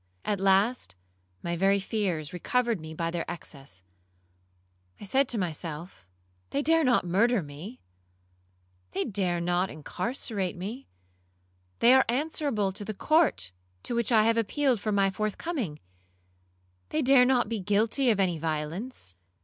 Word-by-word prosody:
At 205 -2 0
last 195 - +2 0.5
my 170 0 -2
very 195 +3 +3
fears 190 -6 -2
recovered 235 +4 0
me 160 0 -8
by 165 +1 -2
their 170 -1 -2
excess. 135 - -8 1.2
I - - -8
said 265 +6 +2
to 235 - +2
myself, 165 - -5 0.4
'They 280 - -1
dare 325 +2 +4
not 250 -8 +3
murder 205 +4 +2
me,—they 90 - -10
dare 185 -5 0
not 175 +2 0
incarcerate 195 - -3
me;—they 90 - -3
are 265 0 +6
answerable 265 -6 0
to 200 +2 -5
the 215 0 -5
court 305 - +2 0.3
to - - -3
which 235 0 0
I 220 -2 +6
have 230 +1 +3
appealed 250 +2 +1
for 215 +1 -2
my 195 -1 +3
forthcoming,—they 90 - -6
dare 260 -1 +6
not 250 -3 +3
be 225 0 -2
guilty 215 +7 +2
of 215 -4 +2
any 180 -4 +1
violence.' 160 - -4
190 Hz, 135 wpm, -28 LUFS, 140-235 Hz, 1.2 s, are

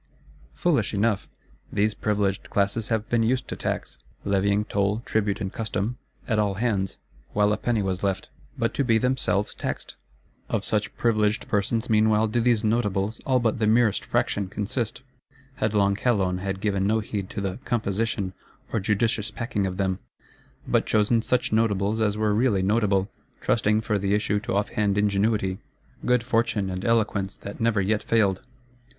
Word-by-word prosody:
Foolish 140 - +1
enough! 105 0 +1 0.4
These 105 +1 +1
Privileged 100 -3 -1
Classes 100 +2 0
have 110 -1 -1
been 120 -1 +2
used 125 +3 +1
to - - -3
tax; 65 - -4 0.3
levying 100 +1 +2
toll, 105 +2 0
tribute 105 -2 0
and 95 -3 -4
custom, 110 +2 -2 0.3
at 110 -3 +1
all 100 -2 +1
hands, 100 -3 -1 0.4
while 105 0 +3
a - - -1
penny 110 -2 0
was 95 -1 -2
left: 95 -2 -1 0.3
but - - 0
to 140 - +1
be 115 -3 +3
themselves 125 -4 0
taxed? - - -5 0.5
Of - - -1
such - - -1
Privileged 110 -2 +1
persons, 110 +3 0
meanwhile, 110 0 +3
do 115 +2 0
these 115 -2 +2
Notables, 105 -2 0
all 130 -2 +4
but 115 -2 0
the 110 - +2
merest 110 -1 +3
fraction, 100 -2 0
consist. 110 +5 -3 0.5
Headlong 100 -2 +2
Calonne 95 -6 +1
had 95 0 -3
given 100 -2 +1
no 110 +2 +2
heed 100 -3 -4
to - - -5
the 95 +1 -3
"composition," 110 -4 -1 0.4
or 115 - +2
judicious 105 +2 +1
packing 115 -5 -2
of 90 -1 -5
them; 95 -1 0 0.7
but - - +2
chosen 110 +2 +3
such 125 -1 0
Notables 110 -1 +1
as 105 -1 +1
were 105 -1 +1
really 105 -4 +2
notable; 100 -1 +2 0.3
trusting 110 -1 +2
for 105 -2 0
the 100 +1 +1
issue 105 0 +1
to 105 -2 -3
off 100 +1 +1
hand 105 -1 0
ingenuity, 100 -1 +1 0.4
good 125 -1 +2
fortune, 115 -5 0
and 95 +1 -4
eloquence 105 -4 +1
that 100 - -9
never 115 -2 +2
yet 105 +2 +1
failed. 100 -5 +2
105 Hz, 165 wpm, -25 LUFS, 100-115 Hz, 0.7 s, all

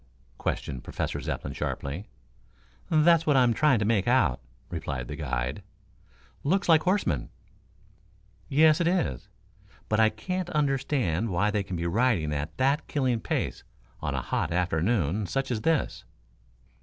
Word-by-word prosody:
questioned 65 -3 -3
Professor - - -3
Zepplin 70 - -4
sharply. 75 +12 -4 0.8
"That's 160 +1 +4
what 145 -3 +4
I'm 125 -2 +4
trying 145 0 +3
to 105 - 0
make 105 -2 +1
out," 120 - +3 0.3
replied 70 -7 -4
the - - -5
guide. 60 +1 -3 0.8
"Looks 190 +7 +1
like 160 -2 +6
horsemen." 185 +4 0 1.2
"Yes, 155 +3 +5
it 170 - +2
is. 80 - -1 0.6
But 105 - +2
I 110 0 +6
can't 175 +12 -4
understand 135 - 0
why 100 +3 +1
they 105 - 0
can 95 -2 -5
be 85 0 -3
riding 90 -5 +1
at 75 +2 -4
that 140 +4 +1
killing 130 -5 0
pace - - -2 0.4
on - - -2
a - - -2
hot 80 - -1
afternoon 90 +2 0
such 135 +9 -2
as 110 -3 -1
this." 160 +4 0
115 Hz, 145 wpm, -27 LUFS, -, 1.2 s, like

